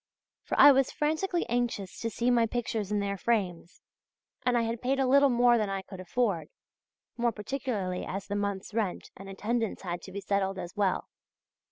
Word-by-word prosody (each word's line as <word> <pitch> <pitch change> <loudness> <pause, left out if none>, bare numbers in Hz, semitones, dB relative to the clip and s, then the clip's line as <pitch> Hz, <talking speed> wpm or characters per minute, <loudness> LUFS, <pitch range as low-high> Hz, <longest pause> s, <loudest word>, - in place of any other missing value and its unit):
For - - -3
I 290 - +10
was 270 -1 +3
frantically 320 +4 0
anxious 235 -5 -2
to 230 - -2
see 240 +3 0
my 235 -2 +4
pictures 225 -3 -2
in 205 -1 +1
their 200 -1 -2
frames 185 -7 -1 0.6
and 245 -1 +2
had 230 0 -1
paid 270 +2 0
a 270 - +3
little 280 +2 +5
more 240 -1 +4
than 210 -2 0
I 195 -1 -3
could 190 -1 -10
afford, 185 -3 -1 0.7
more 235 0 +2
particularly 210 -5 -3
as 195 +1 -5
the 205 - -4
month's 200 0 -3
rent 210 -5 -2
and 195 +1 -10
attendance 220 +3 -2
had 175 -1 -4
to 190 - -10
be 200 - -5
settled 195 -1 -1
as 175 +1 -7
well. 200 -3 0
215 Hz, 185 wpm, -29 LUFS, 195-245 Hz, 0.7 s, I